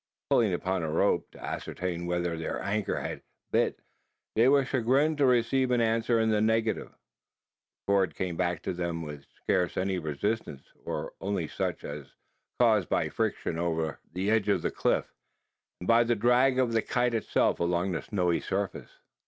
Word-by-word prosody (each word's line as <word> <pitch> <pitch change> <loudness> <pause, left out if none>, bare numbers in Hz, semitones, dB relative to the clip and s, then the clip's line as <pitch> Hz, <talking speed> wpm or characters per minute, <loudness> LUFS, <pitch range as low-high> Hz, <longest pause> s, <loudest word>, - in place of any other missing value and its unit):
Pulling 110 -4 +4
upon 90 +1 -1
the 80 - -2
rope, 80 +1 +1
to - - -16
ascertain 85 -1 -4
whether 85 -1 -1
their 80 0 -3
anchor 100 +2 -1
had - - -5 0.3
"bit," - - +1 0.6
they 115 +3 +5
were 140 -1 +4
chagrined 135 +5 +2
to 140 - +5
receive 125 +1 +2
an 125 -1 +2
answer 115 0 +2
in 110 0 +2
the 105 -1 +2
negative. 110 0 +1
The - - -42
cord 100 -2 +2
came 90 -2 -2
back 90 -2 -1
to - - -2
them 85 -2 -3
with 75 -2 -8 0.2
scarce 90 -1 +1
any 95 0 0
resistance; 80 0 -3 0.2
or - - -4
only 95 -4 -1
such, - - -3
as 70 -1 -6
was - - -28 0.4
caused 110 -6 +4
by - - +1
friction 80 - -2
over 80 -2 -1
the 95 +5 -1
edge 110 -2 +2
of 100 - +2
the - - 0
cliff, - - +1 0.7
and 90 - -7
by 115 +1 +6
the 120 0 +1
drag 125 +4 +3
of 125 -3 +2
the 115 - +3
kite 125 +1 0
itself 115 - +1
along 85 +2 0
the 85 - -2
snowy 90 -5 0
surface. 100 +1 -3
100 Hz, 175 wpm, -29 LUFS, 85-115 Hz, 0.7 s, by